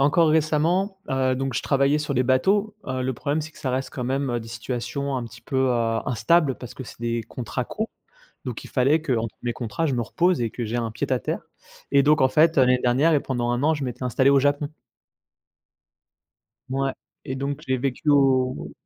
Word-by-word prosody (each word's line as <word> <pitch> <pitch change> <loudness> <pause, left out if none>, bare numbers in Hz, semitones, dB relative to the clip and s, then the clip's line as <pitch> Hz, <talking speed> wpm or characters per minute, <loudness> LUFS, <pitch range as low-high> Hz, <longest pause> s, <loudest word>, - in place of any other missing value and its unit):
encore 155 +3 +4
récemment, 160 +6 +2
heu, 130 -1 +2
donc 135 +1 -2
je - - -1
travaillais 140 +2 +2
sur 145 -2 -2
les 125 - +3
bateaux, 195 - +2
heu, 130 -1 -2
le 130 +1 -1
problème 145 +5 -2
c'est 155 - -8
que - - -17
ça 130 - -3
reste 130 +1 -2
quand 125 - -5
même, 135 +1 -1
heu, 120 -1 -1
des 115 - -10
situations 125 +4 -3
un - - -4
petit 115 +1 -12
peu, 135 - -9
heu, 115 -2 +1
instables 135 +4 +2
parce 125 - -9
que 130 - -8
c'est 115 - -11
des 115 0 -2
contrats 120 +2 -5
courts. 220 +1 -4 0.5
Donc 125 -4 -6
il - - -11
fallait 140 +5 +3
qu'entre 115 -7 -1
mes 120 -1 -2
contrats, 125 +7 -3
je 140 - 0
me 120 - 0
repose 175 +7 +1
et 115 - 0
que 120 +1 -5
j'ai 110 - -3
un 115 -2 -1
pied 110 - -3
à - - +2
terre. - - -3 0.5
Et 140 0 +5
donc 150 +2 +4
en 130 - +5
fait, 160 +3 +3
heu, - - +7
l'année 125 0 +3
dernière 135 +7 +3
et 145 - +3
pendant 120 -2 -1
1 120 +3 -1
an, 160 +2 +4
je 145 -3 -3
m'étais 125 +1 -5
installé 130 +2 +3
au 140 - +5
Japon. 145 +2 0 2.0
Ouais 135 0 0 0.3
et 130 - -4
donc 140 +1 -3
j'ai 130 0 +1
vécu 135 +3 -2
au 130 -2 +2
130 Hz, 225 wpm, -24 LUFS, 120-145 Hz, 2.0 s, heu